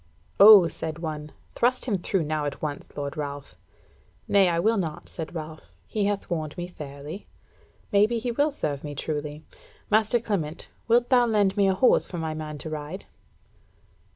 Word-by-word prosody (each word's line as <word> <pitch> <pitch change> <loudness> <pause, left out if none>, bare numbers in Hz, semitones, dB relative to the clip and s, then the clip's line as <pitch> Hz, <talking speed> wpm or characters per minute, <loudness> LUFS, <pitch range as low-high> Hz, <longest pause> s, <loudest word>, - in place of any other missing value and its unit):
"O," 200 -3 +10
said 160 -1 -5
one, 155 -2 -5 0.2
"thrust 250 +2 +1
him 230 -6 0
through 180 0 0
now 155 0 -2
at 145 - -4
once, 145 -1 -6
lord 140 +1 -4
Ralph." 145 -2 -6 0.7
"Nay, 195 -2 +4
I 170 - 0
will 220 +5 +2
not," 160 -5 -4
said 165 +1 -7
Ralph; 155 - -8
"he 205 - -1
hath 205 0 -1
warned 155 -2 -3
me 175 - -3
fairly. 150 +2 -9 0.6
Maybe 210 +4 +3
he 240 +2 -2
will 290 +6 +1
serve 145 - -3
me 145 -1 -6
truly. 150 +1 -4 0.5
Master 220 +2 +3
Clement, 180 -9 -3 0.2
wilt 240 +1 +3
thou 245 -2 +5
lend 205 -3 +2
me 200 -2 +3
a 190 - +2
horse 250 +6 +4
for 175 - -6
my 160 -1 -3
man 155 -1 -6
to 160 - -7
ride?" 155 +5 -6
170 Hz, 175 wpm, -26 LUFS, 150-210 Hz, 0.7 s, O